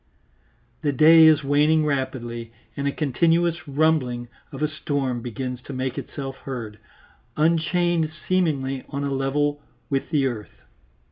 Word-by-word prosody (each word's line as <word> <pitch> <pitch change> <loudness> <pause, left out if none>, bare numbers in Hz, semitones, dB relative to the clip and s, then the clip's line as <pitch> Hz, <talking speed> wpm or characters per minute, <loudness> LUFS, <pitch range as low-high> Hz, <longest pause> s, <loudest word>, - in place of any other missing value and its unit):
The 145 - +1
day 160 +4 +7
is 155 -1 +5
waning 150 +3 +3
rapidly, 125 -5 -3 0.2
and 140 0 -2
a - - +1
continuous 165 +4 +1
rumbling 135 -5 +1 0.2
of - - -5
a - - +3
storm 140 -5 -2
begins 125 +1 -5
to 140 - -7
make 130 -1 -3
itself 135 -2 -6
heard, 115 -6 -7 0.6
unchained 165 +1 +2 0.2
seemingly 140 -8 0
on 140 -1 -3
a 140 -1 -1
level 145 +2 0 0.3
with 135 -1 -1
the 145 -4 +2
earth. 115 -5 -4
140 Hz, 135 wpm, -24 LUFS, 130-155 Hz, 0.6 s, day